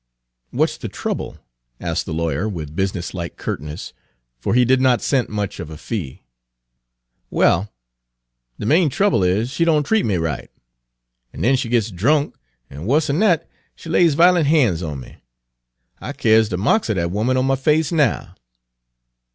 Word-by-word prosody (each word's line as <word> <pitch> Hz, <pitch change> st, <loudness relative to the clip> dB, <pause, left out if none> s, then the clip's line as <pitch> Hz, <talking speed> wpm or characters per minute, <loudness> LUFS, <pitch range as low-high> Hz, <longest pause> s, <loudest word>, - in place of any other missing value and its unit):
"What -, -, +2 dB
's -, -, -9 dB
the -, -, -5 dB
trouble?" -, -, -4 dB, 0.4 s
asked 85 Hz, -2 st, -3 dB
the -, -, -4 dB
lawyer, 80 Hz, +4 st, -1 dB
with 80 Hz, -6 st, -6 dB
business 95 Hz, -2 st, -2 dB
like 85 Hz, -2 st, -6 dB
curtness, 75 Hz, +8 st, -6 dB, 0.5 s
for 90 Hz, -, -1 dB
he 125 Hz, 0 st, +5 dB
did 130 Hz, +1 st, +3 dB
not 130 Hz, -2 st, +3 dB
scent 130 Hz, -4 st, +1 dB
much 105 Hz, -2 st, -4 dB
of 80 Hz, -, -6 dB
a 80 Hz, -, -9 dB
fee. 85 Hz, -, -6 dB, 1.1 s
"Well, 95 Hz, +4 st, +2 dB, 0.9 s
de -, -, -4 dB
main 160 Hz, -, +3 dB
trouble 195 Hz, -, +2 dB
is 100 Hz, +7 st, +1 dB
she 170 Hz, -, 0 dB
doan 155 Hz, -3 st, +3 dB
treat 220 Hz, +9 st, +1 dB
me 105 Hz, -, 0 dB
right. 80 Hz, -4 st, -3 dB, 0.8 s
An' -, -, -8 dB
den 130 Hz, +5 st, +3 dB
she 125 Hz, -3 st, -2 dB
gits 115 Hz, -2 st, +1 dB
drunk, 140 Hz, -, +1 dB, 0.3 s
an' 75 Hz, +8 st, -8 dB
wuss'n 150 Hz, +3 st, +1 dB
dat, 175 Hz, -7 st, +2 dB, 0.3 s
she 165 Hz, -, -11 dB
lays 165 Hz, -2 st, +3 dB
vi'lent 175 Hz, -1 st, +4 dB
han's 125 Hz, -, +3 dB
on 75 Hz, -6 st, -5 dB
me. 60 Hz, -, -13 dB, 0.8 s
I -, -, -6 dB
kyars 110 Hz, -1 st, +3 dB
de 90 Hz, -, -2 dB
marks 115 Hz, -, +1 dB
er 110 Hz, -, +1 dB
dat 85 Hz, -1 st, -1 dB
'oman 120 Hz, +6 st, +1 dB
on 130 Hz, -, +1 dB
my 135 Hz, 0 st, +2 dB
face 150 Hz, +3 st, +1 dB
now." 150 Hz, -8 st, 0 dB
115 Hz, 170 wpm, -20 LUFS, 90-145 Hz, 1.1 s, he